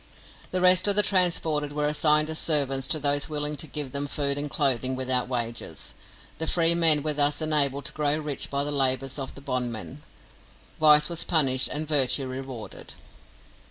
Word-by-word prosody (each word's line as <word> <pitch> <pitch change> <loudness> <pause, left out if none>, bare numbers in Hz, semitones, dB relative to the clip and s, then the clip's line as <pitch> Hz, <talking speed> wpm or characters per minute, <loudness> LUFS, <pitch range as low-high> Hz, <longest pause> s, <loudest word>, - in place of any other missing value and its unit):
The 185 - -3
rest 185 +1 +4
of 200 - +3
the 210 - +5
transported 165 -6 +1
were 150 0 -2
assigned 150 +1 +2
as 160 - -3
servants 135 -4 +1
to - - 0
those 145 0 0
willing 150 0 -4
to 160 - -3
give 145 -2 -5
them 140 +1 -2
food 140 -1 -1
and 145 +1 -4
clothing 130 -3 0
without 130 -1 0
wages. 120 -2 -5 0.5
The 160 - -2
free 170 0 +2
men 160 -4 +4
were 155 -1 0
thus 145 0 +1
enabled 145 -3 0
to - - -3
grow 150 0 0
rich 150 -3 -3
by 140 0 -2
the 145 - -4
labours 135 0 -1
of 135 - -7
the 140 - -12
bondmen 125 0 -5 0.8
vice 150 -1 +6
was 170 -1 -2
punished 135 -6 +2
and 155 +1 -5
virtue 140 -2 +2
rewarded. 130 -3 -9
145 Hz, 180 wpm, -25 LUFS, 135-155 Hz, 0.8 s, vice